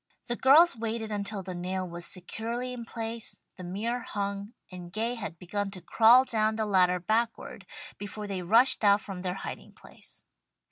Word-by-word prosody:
The 240 - -2
girls 300 +7 +6
waited 225 -1 -3
until 200 -1 -3
the 185 0 -6
nail 185 +1 -3
was 170 0 -4
securely 230 +7 -4
in 235 -2 -7
place, 230 0 -5 0.2
the 185 - -8
mirror 215 +7 -2
hung 200 -1 -4 0.2
and 175 -1 -9
Gay 225 +4 -1
had 205 -8 -6
begun 200 +3 -3
to 195 -1 -8
crawl 230 +7 +6
down 220 -3 +1
the 220 0 0
ladder 180 -3 +3
backward, 220 -1 -2 0.3
before 205 +1 -6
they 195 -2 -3
rushed 230 +8 +4
out 200 0 +5
from 195 -3 -7
their 180 0 -2
hiding - - -7
place. - - -12
210 Hz, 175 wpm, -29 LUFS, 185-230 Hz, 0.3 s, girls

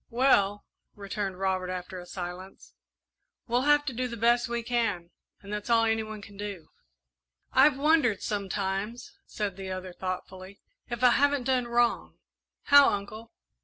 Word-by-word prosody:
"Well," 205 -5 +2 0.3
returned 200 -1 -4
Robert, 190 -1 -1
after 185 0 -5
a 175 - -11
silence, 180 +1 -8 0.7
"we'll 250 +4 +1
have 295 0 +4
to 270 - -3
do 250 +2 -2
the 235 -1 -7
best 235 +2 +2
we 235 0 -2
can, 225 -8 -1 0.3
and 200 +1 -7
that's 210 +2 -5
all 230 -1 +4
any 225 0 +1
one 215 -1 -8
can 200 -1 -13
do." 200 -6 -7 0.8
"I've 270 +1 +5
wondered 285 -8 +2
sometimes," 200 +2 -3
said 205 -3 -4
the 190 -1 -6
other, 185 -1 -6
thoughtfully, 185 +1 -6 0.3
"if 240 0 -4
I 250 - +7
haven't 285 0 +2
done 250 -1 0
wrong." 235 0 0 0.5
"How, 285 -1 +7
Uncle?" 215 +3 -5
210 Hz, 155 wpm, -28 LUFS, 190-240 Hz, 0.8 s, I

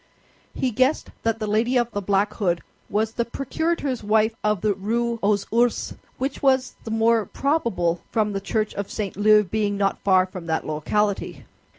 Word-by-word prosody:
He 255 - 0
guessed 260 +6 +1
that 225 -1 0
the 220 - -3
lady 225 +5 +1
of 240 -1 +1
the 205 - -3
black 200 +1 +1
hood 175 -5 -1 0.3
was 215 +2 0
the 235 - -1
procurator's 275 0 -2
wife 220 +1 +3
of 210 -3 +1
the 210 -1 +2
Rue 230 +4 -1
aux 205 +1 +3 0.2
Ours, 240 0 +1 0.2
which 270 +2 -3
was 265 -2 +2
the - - -5
more 225 0 +2
probable 230 - 0
from 210 -2 0
the 195 - -2
church 215 +1 -1
of 200 -1 -4
St. 205 -3 -4
Leu 210 +1 +5
being 205 +1 -1
not 195 -1 0
far 185 -2 +4
from 185 -2 -9
that 160 -1 -1
locality. 200 +7 -1
215 Hz, 180 wpm, -23 LUFS, 200-235 Hz, 0.3 s, Leu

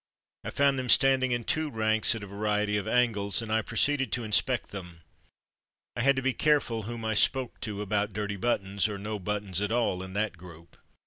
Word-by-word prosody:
I - - -4
found 140 -1 +2
them 125 -1 -4
standing 130 +1 +4
in 120 -1 -1
two 155 +5 -1
ranks 110 -2 +1
at 110 - -6
a - - -5
variety 105 +1 -1
of 100 -2 -2
angles 110 -5 +1
and 110 -1 -3
I 110 - +3
proceeded 135 +5 0
to 120 - -1
inspect 110 +2 +1
them. 90 -4 -9 0.9
I 120 - -2
had 140 +2 +4
to 135 - -2
be 135 0 +1
careful 140 -7 +1
whom 120 -1 -6
I 110 - 0
spoke 130 +4 +2
to 105 -2 -4
about 105 +1 -1
dirty 100 0 -3
buttons, 100 -1 0
or 105 - -4
no 105 +1 -5
buttons 100 -1 -2
at 105 +1 -1
all, 115 -6 0
in 95 0 -8
that 105 -3 -2
group. 85 -1 -14
110 Hz, 205 wpm, -28 LUFS, 100-120 Hz, 0.9 s, standing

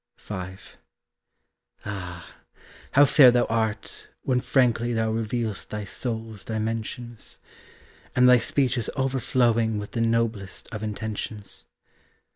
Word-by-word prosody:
V. - - -9 1.5
Ah, 90 -4 -7 0.6
how 145 +2 +8
fair 135 -2 +8
thou 120 0 +3
art 110 -1 -2 0.2
when 125 -2 +2
frankly 120 -3 +2
Thou 110 -1 +1
reveal'st 110 -1 -2
thy 105 0 -4
soul's 110 -1 -4
dimensions, 115 +1 -3 0.8
And 125 0 +6
thy 125 -1 +7
speech 130 0 +1
is 110 - -1
overflowing 120 -4 +1
With 105 0 -5
the 115 - -2
noblest 115 -4 -1
of 105 - -4
intentions. 105 -1 -4
115 Hz, 110 wpm, -25 LUFS, 110-120 Hz, 1.5 s, how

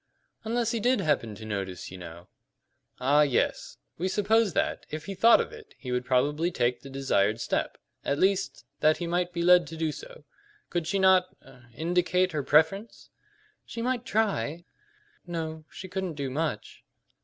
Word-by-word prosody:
"Unless 230 +1 0
he 230 - -1
did 250 +4 +2
happen 120 -8 0
to 110 - -10
notice, 95 -5 -5
you 95 - -8
know." 85 0 -10 0.7
"Ah, 140 +4 +4
yes; 140 -4 0 0.2
we 180 - 0
supposed 210 +1 +2
that, - - -1
if 155 0 -6
he 200 - -5
thought 225 +5 +6
of - - -2
it, 440 -2 -13
he 125 - -7
would 125 0 -1
probably 145 +6 +1
take 125 -8 0
the 135 - -10
desired 115 -6 +1
step - - -2 0.3
at 140 - 0
least, 195 +3 0
that 155 0 +4
he 175 - -4
might 175 +1 0
be 170 -1 -2
led 180 0 +6
to 165 - -8
do 160 -1 0
so. - - -11 0.5
Could 170 -2 -1
she 195 - 0
not 190 -1 +4
er 125 -2 -17
indicate 180 +3 +1
her 155 -2 -1
preference?" 160 - +1 0.5
"She 230 - -6
might 250 -1 -1
try 175 - -1 0.6
no, 160 -2 -5
she 185 - -9
couldn't 190 -2 -3
do 140 -2 -3
much. 150 -6 -3
165 Hz, 175 wpm, -28 LUFS, 135-190 Hz, 0.7 s, thought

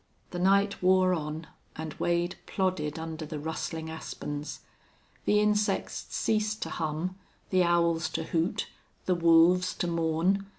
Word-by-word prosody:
The 175 - -4
night 200 +2 +3
wore 185 0 +4
on, 155 -1 -3 0.3
and 160 -1 -5
Wade 175 +1 +1
plodded 180 -6 -1
under 160 0 -5
the 155 0 -5
rustling 160 +1 -4
aspens. 150 -2 -6 0.6
The 210 - +4
insects 210 -1 +1
ceased 215 -1 0
to - - -6
hum, 165 +4 -3 0.3
the 185 -1 +4
owls 170 -2 +2
to - - -1
hoot, 170 +5 -1 0.4
the 185 - +3
wolves 170 +2 +5
to - - -1
mourn. 170 +4 +1
170 Hz, 135 wpm, -29 LUFS, 160-185 Hz, 0.6 s, wolves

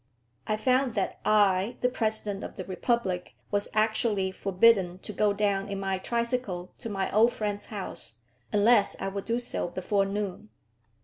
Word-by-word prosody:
I 215 - +1
found 255 +2 +2
that 195 - -1
I, 205 +1 +3
the 250 - +4
President 215 -4 -1
of - - -7
the 185 - -5
Republic, 190 -2 -1 0.2
was 205 0 0
actually 215 -3 +1
forbidden 190 -1 +3
to 210 +3 -8
go 210 0 +2
down 200 -1 0
in 200 -1 -3
my 195 -1 -1
tricycle 235 -5 -2
to 230 - -6
my 195 -2 -2
old 230 +3 +5
friend's 205 -1 -3
house, 195 - -7 0.4
unless 210 0 +4
I - - -2
would 200 0 -5
do 235 +1 0
so 245 -6 -2
before 195 +3 0
noon. 205 +1 -4
205 Hz, 165 wpm, -28 LUFS, 195-225 Hz, 0.4 s, old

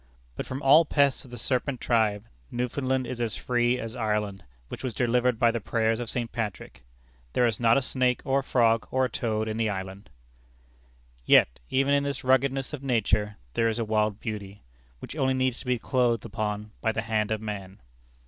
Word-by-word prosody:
But - - -5
from 135 +2 -5
all 145 +5 +7
pests 140 -4 +1
of - - -14
the 120 - -8
serpent 125 +2 -1
tribe, 110 -3 +1 0.2
Newfoundland 130 +2 -1
is 120 0 -5
as 115 -2 -1
free 120 0 +1
as 115 -1 -6
Ireland, 105 -4 -2 0.2
which - - -8
was 125 -4 -3
delivered 125 0 +2
by 120 0 +4
the 115 - -2
prayers 110 +2 0
of 120 -2 -4
St. 120 -2 -3
Patrick. 105 - -5 0.5
There 125 - +3
is 115 -3 0
not 115 0 +4
a 135 - +1
snake 125 -1 +1
or 135 +1 +2
a - - -4
frog 115 -4 +2
or 130 0 +2
a - - -2
toad 110 -2 -2
in 110 0 -3
the 115 -1 +1
island! 95 +1 -6 1.1
Yet, - - +5
even 135 +2 +2
in 140 - +4
this 140 -1 -3
ruggedness 135 +2 +1
of 145 - -5
nature, 105 -5 0 0.2
there 115 0 +2
is 110 - -2
a 115 - -1
wild 105 -1 0
beauty, 100 -2 -6 0.3
which 65 - -8
only 130 -3 +1
needs 130 -2 0
to - - -11
be 125 -1 +2
"clothed 120 -2 +1
upon" 105 -1 -3
by 110 - +1
the 110 0 -3
hand 110 -2 0
of 110 -1 -1
man. 100 -3 -6
115 Hz, 200 wpm, -27 LUFS, 110-130 Hz, 1.1 s, all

